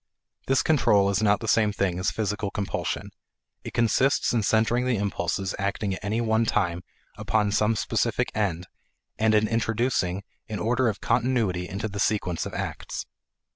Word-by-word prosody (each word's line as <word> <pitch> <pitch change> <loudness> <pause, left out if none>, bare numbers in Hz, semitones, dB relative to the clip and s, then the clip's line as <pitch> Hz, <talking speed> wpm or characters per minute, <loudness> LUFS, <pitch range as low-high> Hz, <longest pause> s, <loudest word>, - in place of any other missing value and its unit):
This 135 - +3
control 100 -10 +3
is 100 - 0
not 105 -1 +3
the 110 - -4
same 110 -1 +3
thing 90 -3 -1
as 90 - +1
physical 105 -1 -2
compulsion; 100 0 -3 0.5
it - - -8
consists 125 +4 +2
in 115 - +2
centering 115 +4 +2
the 125 - +2
impulses 100 -1 -2
acting 100 0 -1
at 95 - -7
any 105 +3 -1
one 110 -1 +2
time 85 -5 0 0.4
upon 105 -2 +1
some 105 +2 +2
specific - - 0
end 95 -5 -1 0.5
and 110 0 +3
in 105 0 +3
introducing 115 -4 0 0.3
an 105 - -3
order 120 +5 +1
of 105 - -5
continuity 110 -8 0
into 100 +3 -3
the 100 -1 -6
sequence 95 -5 0
of - - -9
acts. - - -4
105 Hz, 165 wpm, -26 LUFS, 100-115 Hz, 0.5 s, This